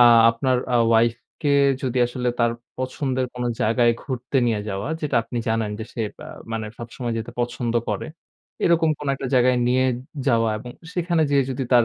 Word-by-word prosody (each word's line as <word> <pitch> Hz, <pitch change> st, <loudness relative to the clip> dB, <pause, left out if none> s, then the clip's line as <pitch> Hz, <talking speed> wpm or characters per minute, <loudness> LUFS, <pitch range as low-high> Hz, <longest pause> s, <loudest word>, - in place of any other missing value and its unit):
আ -, -, +10 dB, 0.3 s
আপনার 125 Hz, +2 st, +1 dB, 0.2 s
আ -, -, +6 dB
ওয়াইফকে 115 Hz, +6 st, +1 dB, 0.3 s
যদি 130 Hz, -1 st, -1 dB, 0.4 s
তার 120 Hz, 0 st, +3 dB, 0.3 s
পছন্দের 130 Hz, 0 st, -1 dB
কোনো 125 Hz, 0 st, -2 dB
জায়গায় 120 Hz, +2 st, +3 dB
ঘুরতে 130 Hz, 0 st, -3 dB
নিয়ে 110 Hz, -3 st, +1 dB
যাওয়া 100 Hz, +5 st, -3 dB
যেটা 145 Hz, -5 st, 0 dB
আপনি 120 Hz, -, -5 dB
জানেন 110 Hz, -1 st, 0 dB
যে 110 Hz, -, -4 dB
সে -, -, -5 dB, 0.3 s
আ -, -, -8 dB, 0.2 s
মানে 110 Hz, -1 st, -2 dB
সবসময় 120 Hz, 0 st, -5 dB
যেতে 115 Hz, +1 st, -5 dB
পছন্দ 120 Hz, -1 st, -2 dB, 0.2 s
করেন, -, -, -3 dB, 0.5 s
এরকম 165 Hz, -2 st, +4 dB
কোনো 145 Hz, -2 st, -2 dB
একটা 135 Hz, 0 st, -5 dB
জায়গায় 125 Hz, 0 st, +4 dB
নিয়ে 130 Hz, +1 st, +3 dB, 0.4 s
যাওয়া 115 Hz, -1 st, +3 dB
এবং 120 Hz, +3 st, -9 dB, 0.2 s
সেখানে 170 Hz, -2 st, +1 dB
যেয়ে 140 Hz, -1 st, +4 dB
যদি 130 Hz, +1 st, -2 dB
তার 120 Hz, -2 st, +7 dB
125 Hz, 170 wpm, -23 LUFS, 115-135 Hz, 0.5 s, আ